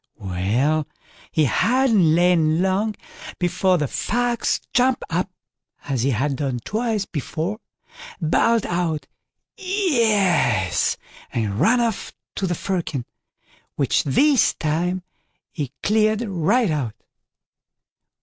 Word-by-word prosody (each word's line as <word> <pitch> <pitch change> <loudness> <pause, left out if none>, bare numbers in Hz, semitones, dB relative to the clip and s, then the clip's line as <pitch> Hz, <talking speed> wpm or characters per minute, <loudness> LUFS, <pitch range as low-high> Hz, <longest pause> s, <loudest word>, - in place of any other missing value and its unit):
Well, 110 +11 0 0.4
he 155 - +2
hadn't 220 - +3
lain 170 -2 +3
long 200 +3 0 0.4
before 180 +1 +2
the 150 -3 -1
Fox 240 - 0
jumped 255 0 +2
up 180 +4 0 0.5
as 135 -4 -2
he 135 - +1
had 135 +3 0
done 135 -4 -2
twice 220 -2 -1
before, 170 +6 -4 0.6
bawled 220 +7 +2
out 170 -3 -1 0.5
"yes" 220 - +2 0.3
and 105 -2 -2
ran 245 +2 +4
off 230 -4 -2 0.2
to 195 - 0
the 175 - -1
firkin, 165 -9 -3 0.7
which - - +1
this 270 - +3
time 175 +4 -1 0.5
he 145 -5 -4
cleared 215 +1 +2
right 195 +4 +1
out. 135 -8 -2
180 Hz, 105 wpm, -22 LUFS, 150-220 Hz, 0.7 s, ran